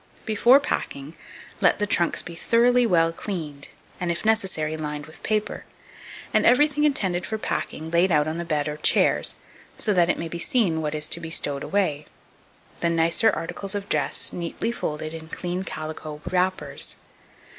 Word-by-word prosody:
Before 235 +5 +5
packing, 145 - -4 0.5
let - - +4
the 210 - 0
trunks 175 -4 +1
be 175 - -8
thoroughly 240 +6 +3
well 165 -4 +3
cleaned, 160 -6 -6 0.3
and, 175 -1 -1
if 170 +5 -4
necessary, 190 -8 +1
lined 150 -1 -5
with 155 - -14
paper, 215 -1 -1 0.7
and - - +4
everything 295 +4 +4
intended 190 -11 +1
for 220 - -3
packing 160 -6 -4
laid 175 +2 +3
out 150 -1 +3
on 160 +2 -3
the - - -2
bed 155 -3 -1
or 150 0 -4
chairs, - - +2 0.4
so 215 - +2
that 175 -2 +3
it - - +1
may 165 - -4
be 170 +1 -6
seen 190 - +1
what 150 0 -2
is 150 0 -2
to - - +4
be 165 -1 -7
stowed 145 -3 0
away; 155 -7 -1 0.7
the 170 - +1
nicer 165 +6 +3
articles 195 +1 -3
of 200 0 -4
dress 150 -2 0
neatly 175 +6 -3
folded 155 -8 -4
in 160 -1 -9
clean 180 +2 -3
calico 155 -3 -6
wrappers. 185 +1 -1
170 Hz, 170 wpm, -24 LUFS, 155-205 Hz, 0.7 s, Before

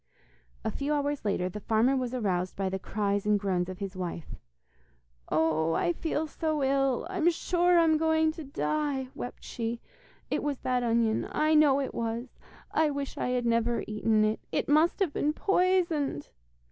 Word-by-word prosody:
A - - 0
few 285 +2 -2
hours 290 0 -1
later 195 -3 0
the 185 +3 -6
farmer 225 +5 +2
was 255 -2 -1
aroused 185 -7 -1
by 195 -1 -1
the 190 0 -3
cries 200 +1 -1
and 210 -1 +3
groans 185 -3 -1
of 185 - -6
his 195 -1 -5
wife. 175 -3 -5 1.0
'Oh, 160 0 +2
I 345 - +1
feel 320 -1 -2
so 310 -1 -2
ill, 270 -1 +1
I'm 360 -2 +2
sure 350 +1 +2
I'm 325 -2 +4
going 320 0 +3
to 320 0 -8
die,' 280 -1 -2
wept 245 - -7
she. 230 0 -4 0.5
'It - - 0
was 290 -2 -2
that 250 -1 0
onion, 230 -2 +1
I 310 +1 +2
know 295 -3 +5
it 270 - -3
was. 230 +2 -4 0.3
I 315 -1 +2
wish 280 -1 -4
I - - -2
had 250 -1 0
never 235 0 +1
eaten 215 0 +1
it. 215 +1 0
It - - -1
must 310 +6 +3
have 350 -7 +1
been 300 +1 0
poisoned. 355 - +1
255 Hz, 175 wpm, -29 LUFS, 210-305 Hz, 1.0 s, know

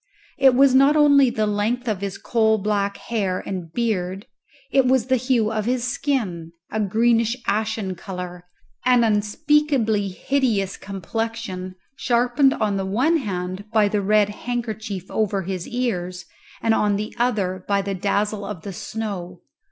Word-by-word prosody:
It 265 -2 +6
was 270 0 +5
not 275 +3 +5
only 285 -3 +6
the 215 -2 0
length 215 +4 -1
of 210 -4 -1
his 200 -1 -4
coal 220 -2 +2
black 200 -1 -1
hair 200 -6 -2
and 180 -4 -5
beard; 195 -3 -2 0.5
it 270 -2 +4
was 255 -2 +3
the 260 0 +2
hue 245 -3 +1
of 215 -2 -2
his 245 0 0
skin, 230 - -2 0.2
a 220 - -2
greenish 230 +3 +2
ashen 215 -2 -1
colour, 180 -1 -7 0.4
an 250 -2 +4
unspeakably 225 0 +2
hideous 205 -1 0
complexion, 200 -1 -5 0.2
sharpened 250 +3 +2
on 205 -2 0
the 195 - -2
one 260 - +2
hand 185 - -4
by 215 -2 +4
the 205 0 0
red 210 +1 +3
handkerchief 220 -4 -4
over 200 -3 0
his 185 -1 -4
ears 185 -7 -3 0.4
and 225 - +3
on 210 -2 +2
the 210 +1 -4
other 195 -7 0
by 200 -1 +1
the 200 0 -3
dazzle 205 +2 -1
of 195 -5 -6
the 200 - -6
snow. 185 -4 -5
215 Hz, 150 wpm, -22 LUFS, 195-240 Hz, 0.5 s, It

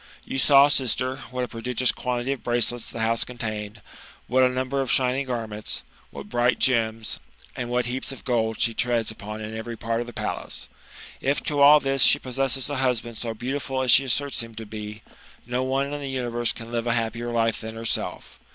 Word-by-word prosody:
You 135 - -2
saw, 140 +1 +7
sister, 130 -1 +1
what 125 0 -2
a - - -2
prodigious 125 +2 0
quantity 125 +1 -2
of 140 - -4
bracelets 120 0 +1
the 115 - -5
house 115 +1 +2
contained, 110 -3 -5 0.4
what 130 +2 +3
a 130 - +6
number 130 +2 -1
of 130 - -2
shining 130 +1 +2
garments, 110 -4 -3 0.3
what 70 0 -9
bright 120 0 +2
gems, 115 -3 +1 0.4
and 120 -1 -4
what 125 0 +1
heaps 130 +3 -2
of 135 - -10
gold 110 -3 0
she 115 - +2
treads 115 -1 +1
upon 105 0 -7
in 110 +1 -5
every 115 +1 -5
part 115 0 -1
of 120 - -5
the - - -7
palace. - - -4 0.5
If 140 +2 +1
to 145 -1 0
all 145 +2 +9
this 135 -1 0
she 140 - +7
possesses 135 -1 -1
a 145 -1 -3
husband 120 -3 0
so 115 -1 -4
beautiful 130 +2 -2
as 125 - +4
she 135 - +7
asserts 135 +1 0
him 115 -1 -7
to 110 0 -6
be, 105 0 -7 0.4
no 125 +1 -1
one 135 +2 0
in 145 - -4
the 140 - -4
universe 120 -3 -1
can 115 0 -9
live 120 0 -1
a 115 - +3
happier 115 +1 -1
life 115 -1 +1
than 110 0 -6
herself. 115 0 -3
120 Hz, 205 wpm, -25 LUFS, 115-130 Hz, 0.5 s, all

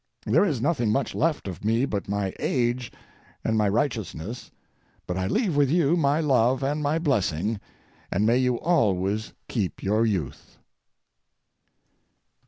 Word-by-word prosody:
There - - +4
is 150 - 0
nothing 135 -8 +1
much 130 +3 0
left 155 -6 0
of 90 -1 -7
me 115 +4 +2
but 100 -7 -4
my 100 -2 -1
age 120 -1 0 0.5
and 110 - 0
my 105 -2 +2
righteousness, 110 - -2 0.6
but 90 - -3
I 95 0 -1
leave 205 - 0
with 145 -2 +3
you 165 0 +3
my 145 -2 +2
love 130 -3 +2
and 145 +3 0
my 150 +2 +1
blessing, 110 - 0 0.5
and 100 +3 +1
may 115 +3 +4
you 125 -2 +1
always 105 - +1
keep 105 -7 -3
your 105 +3 +2
youth. 85 - -3
115 Hz, 145 wpm, -25 LUFS, 100-140 Hz, 0.6 s, There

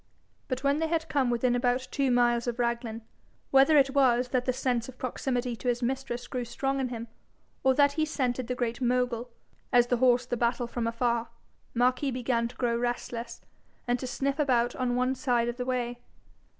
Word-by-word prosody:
But 255 0 -3
when 280 +2 +2
they 325 - +1
had 325 0 -1
come 275 -5 +1
within 245 +1 +1
about 245 +1 0
two 275 -2 +1
miles 240 -1 +2
of 240 0 -2
Raglan, 235 -2 -2 0.5
whether 275 +3 +6
it 270 -1 +4
was 255 -3 +3
that 250 -1 0
the 255 - +2
sense 245 -1 -1
of 255 - -12
proximity 250 -1 -2
to 250 - -7
his 245 0 0
mistress 255 -1 -2
grew 250 -1 -3
strong 270 +3 -2
in 265 - 0
him, 235 -1 -6 0.6
or 265 -1 +4
that 285 0 +5
he 310 +2 0
scented 255 -5 -1
the 250 - -2
Great 240 0 -2
Mogul, 250 -1 0 0.4
as 245 -2 +5
the 245 0 +1
horse 245 0 +4
the 245 - -2
battle 240 +1 0
from 235 -1 -3
afar, 235 0 0 0.5
Marquis 255 +3 +2
began 245 -2 0
to 245 - -13
grow 240 -2 0
restless, 235 -1 -3 0.5
and 245 0 +1
to 255 - -4
sniff 275 +3 -2
about 245 -4 +2
on 250 -2 -1
one 255 +1 +1
side 245 -3 +1
of 240 0 -3
the 250 - -3
way. 245 -1 -2
245 Hz, 200 wpm, -28 LUFS, 240-265 Hz, 0.6 s, whether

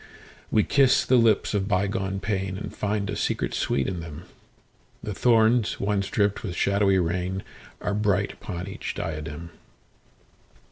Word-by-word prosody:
We 105 - +3
kiss 135 -2 +4
the 130 - +4
lips 115 -3 +3
of 100 -2 0
bygone 95 -1 0
painAnd 95 -1 -3
find 105 -1 -1
a 105 - -3
secret - - -1
sweet 70 - 0
in 90 -3 -3
them:The 85 +5 -11
thorns 115 +1 +3
once 100 -1 0
dripped 100 -1 +1
with 90 -5 -5
shadowy 100 +1 +2
rainAre 90 +3 -3
bright 100 -1 +1
upon 90 -1 -6
each 95 - -5
diadem. 80 +1 -5
100 Hz, 130 wpm, -25 LUFS, 90-105 Hz, -, kiss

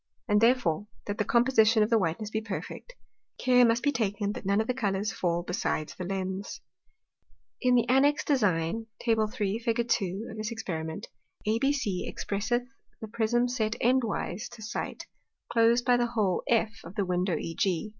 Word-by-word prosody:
And 210 -1 +3
therefore, 225 -7 +2 0.2
that 205 0 -4
the - - +3
Composition 225 -2 +4
of 210 - -2
whiteness 210 0 +1
be 220 - -1
perfect, 225 - -7 0.4
care 250 -1 +4
must 235 0 +3
be 285 - +3
taken 205 -4 -1
that 200 - -7
none 200 +1 +3
of 220 - +1
the 250 - 0
Colours 205 -3 -1
fall 175 -1 -1
besides 175 -3 -2
the 180 - -6
Lens. 190 +1 -4 1.0
In 250 -1 +4
the 240 -1 +3
annexed 280 +4 +3
Design, 210 - +1
Tab. 225 -2 +1
3. 210 -2 -1
Fig. 230 0 0
2. 200 0 -1
of 220 - -9
this 215 +1 -3
Experiment, 160 -8 -5 0.4
ABC 225 -3 0
expresseth 240 +5 -1 0.3
the 220 - -6
Prism 235 +2 +1
set 230 -3 -1
end 255 +2 +3
wise 215 -3 -3
to 235 -2 -11
sight, 225 - -5 0.5
close 235 +1 +4
by 245 0 +4
the 240 0 +1
hole 210 -6 0
F 220 -3 +1
of 185 - -11
the 200 - 0
Window 180 0 0
EG. 175 +3 -1
220 Hz, 170 wpm, -28 LUFS, 195-240 Hz, 1.0 s, Composition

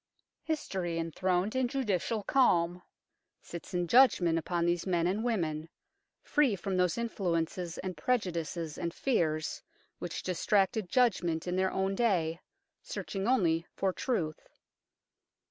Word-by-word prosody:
History, 190 - -2
enthroned 180 - 0
in 260 -1 +2
judicial 225 -4 -1
calm, 180 -9 +3 0.6
sits 170 +1 -8
in 175 -1 0
judgment 185 -9 +5
upon 170 +1 -1
these 175 +1 0
men 170 -2 +2
and 195 +5 0
women, 165 -9 -1 0.5
free 285 -8 +2
from 195 0 -3
those 180 0 +2
influences 175 -6 -2
and 185 -1 -4
prejudices 170 -5 -2
and 170 -1 -3
fears 155 - 0 0.4
which - - -5
distracted 195 +2 +1
judgment 180 -10 +2
in 180 - -1
their 190 0 +2
own 190 +1 0
day, 180 -7 +1 0.4
searching 210 - -4
only 170 -10 +2
for 190 -1 0
truth. 170 - -2
180 Hz, 125 wpm, -31 LUFS, 170-215 Hz, 0.6 s, judgment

